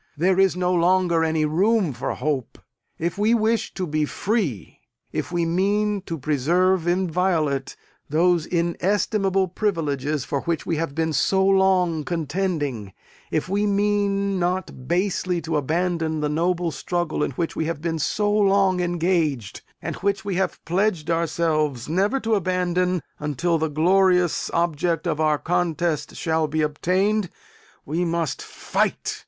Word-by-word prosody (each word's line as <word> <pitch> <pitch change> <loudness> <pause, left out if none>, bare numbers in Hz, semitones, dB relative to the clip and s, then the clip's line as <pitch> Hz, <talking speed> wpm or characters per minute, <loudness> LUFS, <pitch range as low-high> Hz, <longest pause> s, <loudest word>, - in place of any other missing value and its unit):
There 185 +4 +2
is 195 -2 +4
no 180 0 0
longer 175 -1 +3
any 160 -1 +1
room 185 +2 +2
for 125 +3 -3
hope. 145 -5 -2 0.4
If 170 +4 -3
we 220 +3 +3
wish 225 0 +1
to 185 - -2
be 155 -1 0
free 155 - -2 0.3
if - - -3
we 170 -1 0
mean 200 +4 +1
to 165 - -3
preserve 165 +6 +1
inviolate 175 -6 0 0.3
those 170 +2 +2
inestimable 190 +2 0
privileges 150 - -1
for 140 - -2
which 170 -1 -2
we 165 - -1
have 155 -3 -3
been 160 -1 0
so 190 +6 +2
long 190 -4 +3
contending 150 - -2 0.4
if 155 - -1
we 205 +2 0
mean 200 -1 +1
not 175 -7 -2
basely 180 0 0
to 160 0 -3
abandon 160 +2 0
the 150 0 -1
noble 170 +2 0
struggle 175 -1 -2
in - - +1
which 165 +5 -3
we 160 - -1
have 165 -2 -3
been 165 0 -2
so 205 +7 0
long 195 -3 +3
engaged, 170 - 0 0.2
and - - -4
which 200 0 -1
we 200 - -2
have 190 +2 -2
pledged 175 -2 0
ourselves 155 -5 0
never 195 - +1
to 225 0 0
abandon, 180 -2 0 0.2
until 160 +3 0
the 160 0 0
glorious 180 +2 +2
abject 170 0 0
of 160 -3 -1
our 155 -1 +3
contest 170 -1 -1
shall 160 -1 0
be 155 +1 0
obtained 185 +6 +1 0.6
we 165 +5 -1
must 170 -3 -1
fight! - - -2
175 Hz, 145 wpm, -23 LUFS, 155-190 Hz, 0.6 s, is